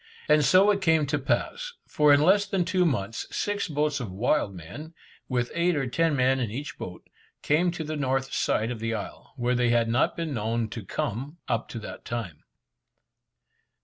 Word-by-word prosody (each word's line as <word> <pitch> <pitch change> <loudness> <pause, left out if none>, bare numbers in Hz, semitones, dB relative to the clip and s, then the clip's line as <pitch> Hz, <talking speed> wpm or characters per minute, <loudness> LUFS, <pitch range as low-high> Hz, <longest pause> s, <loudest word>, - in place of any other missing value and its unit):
And 150 -1 +5
so 185 +9 +6
it 200 -1 0
came 160 -4 +3
to 145 +1 -1
pass, 485 - -1
for 150 -1 +3
in 145 0 +6
less 200 +4 +4
than 190 -3 0
two 185 -1 +2
months, 115 -6 -2
six 205 -1 -2
boats 150 -2 0
of 115 -7 -5
wild 110 +4 +1
men, 145 - -9 0.3
with 125 -2 0
eight 170 +1 +2
or 140 -2 0
ten 160 +5 +1
men 130 0 +3
in 120 -4 -1
each 140 +7 -5
boat, 90 - -8 0.4
came 165 +5 +3
to 170 -2 -4
the 155 0 -4
north 135 -2 -1
side 110 +3 +1
of 120 - -5
the 115 0 -2
isle, 105 - -8
where 125 -1 0
they 125 -1 +2
had 120 -1 +3
not 120 +3 +1
been 165 -3 -2
known 115 0 -1
to 115 - -6
come 125 - -4
up - - -1
to - - -6
that - - -8
time. 105 -10 -5
140 Hz, 195 wpm, -27 LUFS, 115-160 Hz, 0.4 s, so